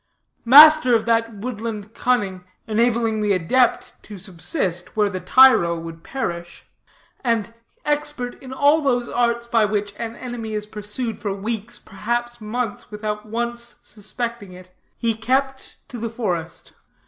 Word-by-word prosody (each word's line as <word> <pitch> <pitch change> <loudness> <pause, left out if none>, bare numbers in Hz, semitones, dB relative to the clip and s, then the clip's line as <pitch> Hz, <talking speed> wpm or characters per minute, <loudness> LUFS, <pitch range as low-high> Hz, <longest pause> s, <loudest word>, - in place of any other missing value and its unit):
Master 295 0 +9
of 225 - +1
that 230 0 +1
woodland 220 -1 -6
cunning 200 -9 0 0.2
enabling 225 0 +1
the 205 -1 +2
adept 230 +8 +1
to 210 - -10
subsist 180 - -2
where 205 -1 +2
the 185 - -4
tyro 180 -5 +5
would 165 0 -9
perish, 175 -10 -5 0.6
and 230 -2 0 0.3
expert 295 -4 -2
in 260 - -10
all 285 +4 +3
those 245 -4 0
arts 235 0 0
by 235 -2 +2
which 205 -1 -1
an 230 0 -5
enemy 235 -3 -6
is 210 0 -2
pursued 210 +3 -5
for 200 -3 -2
weeks, 220 +3 -4
perhaps 240 +4 -4
months, 220 +1 -4
without 210 0 -5
once 235 +1 -4
suspecting 215 -1 -6
it, 180 0 -14 0.3
he 230 -1 0
kept 265 +4 -2
to 245 - -8
the 230 +1 -3
forest. 180 -8 -4
225 Hz, 140 wpm, -22 LUFS, 205-245 Hz, 0.6 s, Master